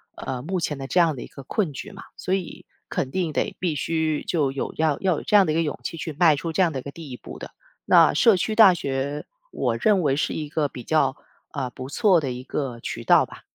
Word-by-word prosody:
呃， 125 -2 -5
目 180 +5 -3
前 150 -2 -2
的 135 0 -6
这 180 - -2
样 170 -3 +5
的 - - -6
一 - - -9
个 140 - -12
困 165 0 -1
局 205 - -8
嘛， 195 -1 -11
所 185 - -3
以 185 -3 -4 0.2
肯 130 - -2
定 175 -5 -1
得 210 - -1
必 175 -4 -1
须 160 +1 -1
就 145 -6 0
有， 135 - -4
要 155 -2 +1
要 185 -5 +1
有 - - -6
这 210 - +1
样 200 -2 +7
的 - - 0
一 155 - -1
个 165 - +2
勇 150 - -2
气 165 - -5
去 160 0 -5
迈 155 -1 +4
出 165 +2 -4
这 190 - +3
样 170 - +2
的 135 - -4
一 - - -6
个 - - -6
第 160 -2 -10
一 125 - -6
步 - - -10
的。 - - -9 0.3
那 - - +5
社 225 -6 +5
区 215 +4 -1
大 205 -5 +8
学， 140 -1 -3 0.3
我 - - -1
认 210 -4 +3
为 135 -3 +2
是 150 - -1
一 155 -2 -4
个 145 -1 -1
比 125 -2 -10
较， 140 -4 +2 0.4
呃， 135 -4 -3
不 130 0 -8
错 190 -1 +3
的 135 -3 -3
一 125 +1 -7
个 130 -6 -4
渠 - - -6
道 - - +5
吧。 - - -14
155 Hz, 290 characters per minute, -24 LUFS, 135-180 Hz, 0.4 s, 大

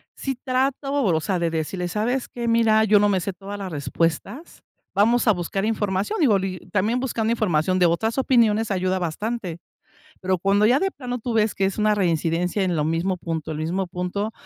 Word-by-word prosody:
sí 270 -1 -3
trato, 275 +2 0
o 170 -7 +2
sea, 185 +2 -1
de 170 -1 0
decirles: 170 +3 -3
"Sabes 240 +6 -1
que 240 -1 -5
mira 225 -1 +4
yo 210 0 +5
no 205 - +3
me 195 -2 +2
sé 185 +2 -4
todas 200 +2 -8
las 190 -2 -5
respuestas, 165 - -3 0.3
vamos 230 +5 +3
a 215 - +6
buscar 190 +2 -2
información", 205 - -1
digo, 220 -10 +4
li 185 -1 -4
también 215 +5 +1
buscando 230 -3 -1
información 185 -5 +1
de 180 - +4
otras 220 +8 0
opiniones 225 -5 +2
ayuda 185 0 0
bastante. 180 +1 -3 0.6
Pero 185 0 +1
cuando 200 +3 +2
ya 250 +5 +4
de 385 0 0
plano 250 -5 -5
tú 235 +1 -3
ves 215 -1 +2
que 195 - +1
es 190 - -2
una 215 -1 +2
reincidencia 175 +1 0
en 180 -2 0
lo 150 - 0
mismo 165 +4 0
punto 165 -2 -4
el 155 - -4
mismo 175 +4 -2
punto, 180 +5 -3
200 Hz, 200 wpm, -23 LUFS, 180-225 Hz, 0.6 s, a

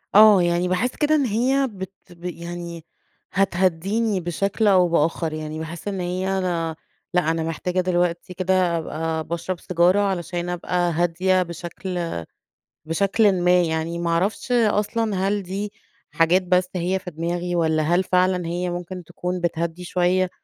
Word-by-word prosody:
آه، 210 -3 +8
يعني 175 +1 +1
باحس 215 +8 0
كده 305 0 +2
إن 285 - +2
هي 255 +5 +2
بت 190 -1 -7 0.3
يعني 170 -1 -6 0.5
هتهدّيني 195 +3 +1
بشكل 195 +5 0
أو 185 -3 +5
بآخر. 165 0 +1
يعني 155 0 -5
باحس 165 +4 -7
إن 195 -2 -2
هي 180 +1 -2 0.2
لا 165 -3 -1 0.4
لأ 175 -3 +2
أنا 165 -1 -1
محتاجة 180 +3 -1
دلوقتي 175 0 0
كده 185 -2 +1
أبقى 160 0 -3
باشرب 170 +2 -4
سيجارة، 180 +2 +3
علشان 175 -3 -1
أبقى 175 0 0
هادية 175 +3 +2
بشكل 170 - -5 0.7
بشكلٍ 195 +6 +2
ما 180 0 +5
يعني. 160 +1 -2
ما 170 0 -1
أعرفش 200 +8 0
أصلًا 210 -3 +1
هل 205 0 0
دي 200 +3 -4 0.4
حاجات 170 +3 +3
بس 180 0 +2
هي 180 +2 0
في 185 -1 -8
دماغي، 175 +2 -2
والّا 160 -2 +2
هل 175 +4 +2
فعلًا 180 -1 +2
هي 175 +1 -2
ممكن 175 0 -6
تكون 180 +2 -4
بتهدّي 170 +1 -2
شويّة؟ 180 +1 +1
180 Hz, 145 wpm, -23 LUFS, 170-190 Hz, 0.7 s, آه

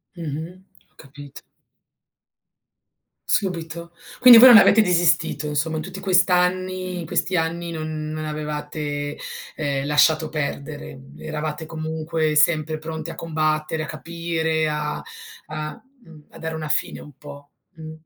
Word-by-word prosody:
Mh-mh. 165 +3 -6 0.3
Ho - - -38
capito. 145 -1 -13 1.9
Subito, 170 -3 -2 0.3
quindi 245 -2 +10
voi 260 - +10
non 240 -3 +10
avete 220 0 +6
desistito, 170 -4 +2
insomma, 150 +2 -1
in 155 - -2
tutti 190 0 -8
quest'anni 185 -1 +1
in - - -7
questi 185 +4 -1
anni, 170 +1 -2
non 155 -1 -5
non 155 0 -4
avevate, 150 -1 -4 0.4
ehm, 140 -2 -2
lasciato 155 +2 +3
perdere; 145 - -5 0.2
eravate 155 0 -5
comunque 160 -1 -2
sempre 155 0 +2
pronti 160 +1 -6
a 165 - -7
combattere, 155 -1 -1
a - - -5
capire, 160 0 -2
a 150 0 -3 0.4
a 155 -1 -5 0.3
mh, 165 -2 -15
a - - -14
dare 160 0 -4
una 155 -1 -5
fine - - -1
un 145 -3 -14
po'. 145 0 -12 0.2
Mh. 155 0 -9
155 Hz, 135 wpm, -22 LUFS, 150-170 Hz, 1.9 s, quindi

